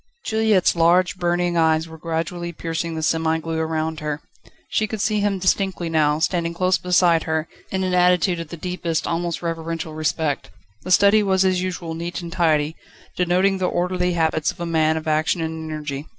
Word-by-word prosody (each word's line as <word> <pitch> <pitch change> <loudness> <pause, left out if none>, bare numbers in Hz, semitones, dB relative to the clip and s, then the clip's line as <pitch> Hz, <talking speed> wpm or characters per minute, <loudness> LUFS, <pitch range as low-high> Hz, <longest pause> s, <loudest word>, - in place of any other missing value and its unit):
Juliette's 220 -5 +2
large, 175 +3 +3
burning 175 0 0
eyes 160 0 +2
were 160 - -11
gradually 170 +2 -3
piercing 165 0 -4
the 160 - -3
semi 160 0 +1
gloom 160 0 -3
around 160 0 -2
her. 150 -1 -3 0.5
She 215 - 0
could 220 +1 -5
see 210 +1 +1
him 205 -1 +1
distinctly 185 -2 0
now, 150 -2 +2
standing 170 +1 -1
close 185 +1 +2
beside 175 -2 +3
her, 160 0 -1 0.2
in 190 0 -1
an 185 -1 -1
attitude 180 0 +3
of 165 - -5
the 170 - -8
deepest, 170 -1 -2
almost 170 0 -2
reverential 165 -1 -4
respect. 155 - -1 0.3
The 185 - -8
study 200 +3 +5
was 190 -2 +2
as 185 -1 +2
usual 180 -3 -4
neat 170 +2 -4
and 170 -1 -7
tidy, 160 -3 +1 0.4
denoting 185 +2 +2
the 185 - +1
orderly 180 0 0
habits 160 -2 +1
of - - -18
a 170 - -3
man 160 -1 +2
of 160 - -6
action 155 +3 +1
and 160 -1 -4
energy. 150 -1 -5
170 Hz, 185 wpm, -22 LUFS, 160-180 Hz, 0.5 s, study